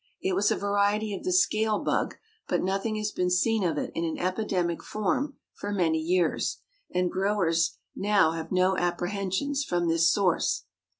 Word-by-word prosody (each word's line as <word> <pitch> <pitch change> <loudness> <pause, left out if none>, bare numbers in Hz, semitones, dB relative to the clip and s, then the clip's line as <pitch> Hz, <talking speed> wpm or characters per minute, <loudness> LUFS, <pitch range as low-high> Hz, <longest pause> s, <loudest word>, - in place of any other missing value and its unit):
It 190 - -1
was 200 +3 +2
a - - +2
variety 205 +1 +1
of 195 - -6
the 365 - -1
scale 220 - +3
bug; - - -1 0.3
but - - 0
nothing 195 +4 -1
has 210 0 -2
been 180 -2 0
seen 215 +4 +2
of 165 -4 0
it - - -2
in 165 - -2
an 160 -1 -2
epidemic 185 -2 -1
form 255 +7 -2 0.2
for 205 - -5
many 170 -5 +1
years, 175 +1 0 0.3
and 180 0 0
growers 185 -4 +1 0.2
now 195 -5 +3
have 165 -1 -5
no 185 +1 +3
apprehensions 190 +10 -1
from 175 -7 0
this 165 0 +4
source. 190 -4 +1
190 Hz, 170 wpm, -27 LUFS, 175-210 Hz, 0.3 s, this